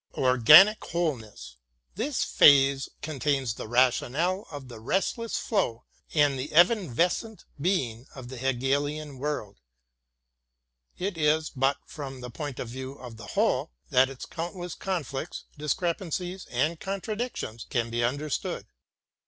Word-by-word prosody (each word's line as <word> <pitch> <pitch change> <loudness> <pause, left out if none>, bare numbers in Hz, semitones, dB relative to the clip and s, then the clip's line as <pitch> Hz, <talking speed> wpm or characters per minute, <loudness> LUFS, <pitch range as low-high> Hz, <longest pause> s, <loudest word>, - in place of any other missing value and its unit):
Organic 140 - +7
Wholeness! 110 - -3 0.4
This 245 +7 -1
phrase 140 -1 +5
contains 140 -4 -1
the - - -7
rationale 130 - +1
of 145 -4 -8
the 120 -3 -10
restless 195 - -1
flow 185 - -1 0.3
and 145 -3 +3
the 135 +4 -5
evanescent 180 - +2 0.2
being 135 - -1
of 130 -3 -9
the 130 - -7
Hegelian 140 +3 -1
world. 140 -8 -4 1.4
It 185 -2 -3
is 155 +1 +2
but 135 +1 +1
from 135 -3 -8
the 125 0 -7
point 145 +1 -5
of - - -4
view 130 +2 -6
of 125 -4 -11
the 110 -3 -10
whole - - +1 0.2
that 130 +1 +5
its 135 -2 -8
countless 175 0 -5
conflicts, 165 -5 -4
discrepancies, 175 +4 -2
and 150 +7 0
contradictions 195 - -4
can 115 -2 -1
be 120 0 0
understood. 145 +5 -2
145 Hz, 125 wpm, -27 LUFS, 125-175 Hz, 1.4 s, Organic